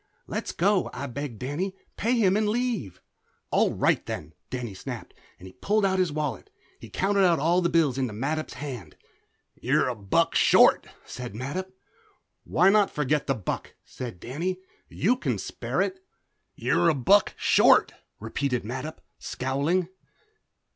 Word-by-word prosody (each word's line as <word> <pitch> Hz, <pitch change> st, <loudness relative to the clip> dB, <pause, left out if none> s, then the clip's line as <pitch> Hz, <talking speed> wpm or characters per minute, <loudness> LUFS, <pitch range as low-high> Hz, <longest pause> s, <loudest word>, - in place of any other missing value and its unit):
"Let's -, -, -4 dB
go," 195 Hz, +2 st, +2 dB
I 140 Hz, -, -4 dB
begged 140 Hz, -2 st, -5 dB
Danny. 155 Hz, -, -3 dB, 0.2 s
"Pay 240 Hz, +3 st, +1 dB
him 195 Hz, -4 st, +3 dB
and 210 Hz, 0 st, +2 dB
leave." 220 Hz, -, -2 dB, 0.5 s
"All -, -, +3 dB
right -, -, +1 dB
then!" -, -, -5 dB, 0.2 s
Danny 120 Hz, -4 st, -4 dB
snapped, 95 Hz, -, -7 dB, 0.3 s
and 95 Hz, +1 st, -11 dB
pulled 210 Hz, 0 st, +2 dB
out 190 Hz, -1 st, +1 dB
his 180 Hz, -4 st, +2 dB
wallet. 150 Hz, -, -3 dB, 0.3 s
He -, -, -11 dB
counted 200 Hz, +1 st, +1 dB
out 175 Hz, -3 st, +4 dB
all 170 Hz, +5 st, +2 dB
his 170 Hz, -1 st, +1 dB
bills 155 Hz, -6 st, +2 dB
into 130 Hz, -4 st, -1 dB
Mattup's 145 Hz, +9 st, -3 dB
hand. 125 Hz, -, -7 dB, 0.6 s
"You're -, -, +1 dB
a -, -, -1 dB
buck 100 Hz, -2 st, +1 dB
short," -, -, +5 dB, 0.2 s
said 125 Hz, -4 st, -7 dB
Mattup. 165 Hz, +11 st, -4 dB, 0.7 s
"Why 190 Hz, +2 st, +4 dB
not 205 Hz, -1 st, +4 dB
forget 150 Hz, 0 st, 0 dB
the 135 Hz, -, +1 dB
buck?" 105 Hz, -6 st, -5 dB
said 120 Hz, -8 st, -7 dB
Danny. 170 Hz, -, -3 dB, 0.3 s
"You 245 Hz, +6 st, +1 dB
can -, -, -1 dB
spare -, -, -2 dB
it." 375 Hz, 0 st, -5 dB, 0.5 s
"You're 170 Hz, -, +2 dB
a 160 Hz, -, +2 dB
buck 195 Hz, +11 st, +4 dB
short," -, -, +5 dB, 0.3 s
repeated 125 Hz, +3 st, -2 dB
Mattup, 130 Hz, +8 st, -6 dB, 0.2 s
scowling. 145 Hz, +8 st, -1 dB
150 Hz, 150 wpm, -26 LUFS, 125-190 Hz, 0.7 s, short